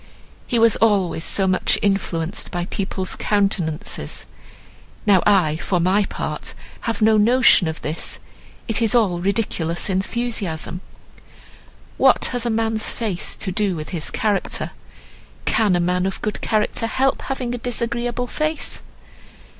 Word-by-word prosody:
He 240 - +1
was 230 -1 +5
always 195 -7 +2
so 195 - +2
much 185 -1 +2
influenced 185 -4 0
by 175 -1 -3
people's 190 -1 -3
countenances; 195 -6 -1 0.8
now 195 -4 +5
I, 175 -7 +4
for 180 +2 -1
my 190 +4 +3
part, - - -5 0.3
have 220 -1 -1
no 220 0 +5
notion 230 -4 +5
of 160 0 -5
this, 155 +2 -2 0.5
it 225 0 0
is 225 0 +2
all 195 -7 +3
ridiculous 185 -3 0
enthusiasm. 190 -4 -2 1.2
What - - +5
has 245 -1 -1
a - - +1
man's 225 -1 +1
face 210 -7 -2
to 190 - -3
do 200 -1 0
with 155 -1 -6
his 165 -5 -1
character? 205 -3 -1 0.7
Can 205 -5 +3
a - - +2
man 180 +1 +1
of 195 - -4
good 215 - -2
character 215 +1 0
help 265 +4 +1
having 255 -2 -3
a 245 - -4
disagreeable 240 +1 -2
face?" 310 +5 -2
205 Hz, 140 wpm, -21 LUFS, 180-230 Hz, 1.2 s, was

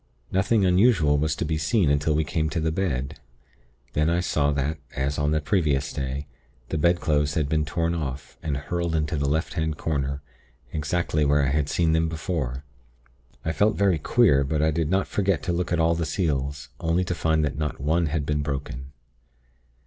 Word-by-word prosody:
Nothing 100 +2 +2
unusual 90 -6 +4
was 80 +1 0
to - - -2
be 80 0 -1
seen 80 +1 +2
until 75 +1 +1
we 80 - +2
came 80 +1 -1
to 80 - -2
the 80 0 0
bed; 75 -8 -2 0.7
then 75 +2 +2
I 85 +1 +2
saw 75 -4 +1
that, 70 +3 -1 0.2
as 70 +2 -1
on 75 0 +1
the 75 0 +2
previous 75 -5 0
day, 65 +2 -3 0.4
the 80 - -1
bedclothes 75 -3 +2
had 75 -3 +1
been 75 +1 +1
torn 85 +3 -1
off, 70 -5 -5
and 75 -3 -2
hurled 85 +3 -2
into 75 0 0
the 70 -1 0
left 80 +3 -1
hand 80 -2 -1
corner, 70 -3 -2 0.5
exactly 75 0 0
where 75 0 +3
I 70 - +2
had 75 0 0
seen 80 -2 +2
them 80 0 +2
before. 75 -5 -3 0.8
I 80 - +1
felt 105 +7 +2
very 95 -5 +3
queer; 75 - +4
but 75 +3 -1
I 80 - +3
did 80 -1 -1
not 95 +1 +1
forget 100 -6 0
to 90 - -1
look 90 +1 -2
at 85 - +1
all 80 +1 +3
the 85 0 -1
seals, 70 -5 -2
only 85 +2 +1
to 90 - -2
find 80 -2 +1
that 75 - -2
not 75 -1 -2
one 80 +4 +1
had 75 -1 -1
been 75 0 0
broken. 70 -2 -5
80 Hz, 195 wpm, -25 LUFS, 70-85 Hz, 0.8 s, unusual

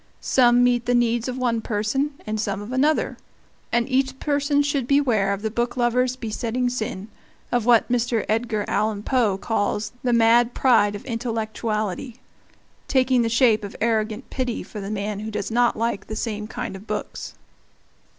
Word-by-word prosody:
Some 245 -1 +4
meet 245 -1 +2
the 245 - +3
needs 240 0 +1
of 255 0 -3
one 240 -3 0
person, 235 +8 -1
and 215 0 -3
some 200 -2 -2
of 205 +3 -7
another; 290 +4 +1 0.5
and 235 0 +1
each 265 0 0
person 285 0 +1
should 285 -3 -1
beware 245 -9 +2
of 200 +1 -3
the 220 - -1
booklover's 240 +2 0
besetting 240 +1 -2
sin, 215 -5 -4 0.4
of 245 -2 0
what 235 -2 +5
Mr. 240 -2 +1
Edgar 220 -1 0
Allan 210 -1 0
Poe 230 -7 +1
calls 205 0 -1
"the 250 - +1
mad 235 +1 +4
pride 215 -6 +3
of 205 - -8
intellectuality," 225 -2 -3 0.7
taking 255 -2 +3
the 230 - +1
shape 230 -2 +3
of 200 - -7
arrogant 220 +1 0
pity 255 -3 -2
for 210 - -9
the 195 - -5
man 205 -1 -3
who 215 +1 -5
does 210 0 -4
not 240 +1 +2
like 230 -2 -2
the 220 - -5
same 215 -1 -3
kind 230 -3 -5
of 195 +3 -11
books. 210 - -5
235 Hz, 170 wpm, -23 LUFS, 215-250 Hz, 0.7 s, what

